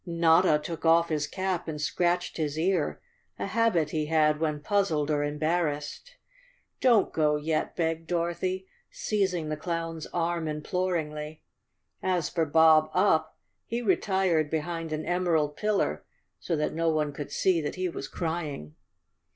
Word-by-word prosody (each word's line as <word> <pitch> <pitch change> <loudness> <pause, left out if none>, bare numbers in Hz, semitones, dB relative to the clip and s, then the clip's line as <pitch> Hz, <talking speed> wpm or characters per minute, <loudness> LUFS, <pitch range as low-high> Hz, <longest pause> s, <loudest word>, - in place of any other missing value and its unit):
Notta 170 -1 +4
took 165 -2 -6
off 165 +1 +4
his 150 -2 -1
cap 185 +1 -2
and 155 -2 -4
scratched 175 +3 0
his 155 -2 -2
ear, 170 -1 0 0.4
a - - -3
habit 200 -7 +1
he 155 -1 -1
had 155 -1 +3
when 155 -2 -1
puzzled 155 -4 0
or 145 -1 +1
embarrassed. 150 - -2 0.6
"Don't 235 -6 +4
go 150 -1 +2
yeti" 155 +1 -1
begged 165 -1 -1
Dorothy, 175 +2 -1 0.2
seizing 190 -7 -1
the 155 - -2
clown's 165 -1 -4
arm 170 -1 -1
imploringly. 155 -1 -3 0.6
As 180 -4 0
for 165 -2 0
Bob 160 0 +5
Up, 160 -5 +2 0.3
he 235 +1 -3
retired 190 -5 +2
behind 165 +1 -3
an 155 0 -3
emerald 165 -5 +1
pillar 210 -1 0 0.4
so 170 - -2
that 150 0 -1
no 165 +1 +1
one 155 -2 0
could 145 0 -7
see 180 -4 +2
that 150 - -4
he 185 0 -1
was 155 -5 -5
crying. 155 - -4
165 Hz, 145 wpm, -28 LUFS, 150-180 Hz, 0.6 s, Bob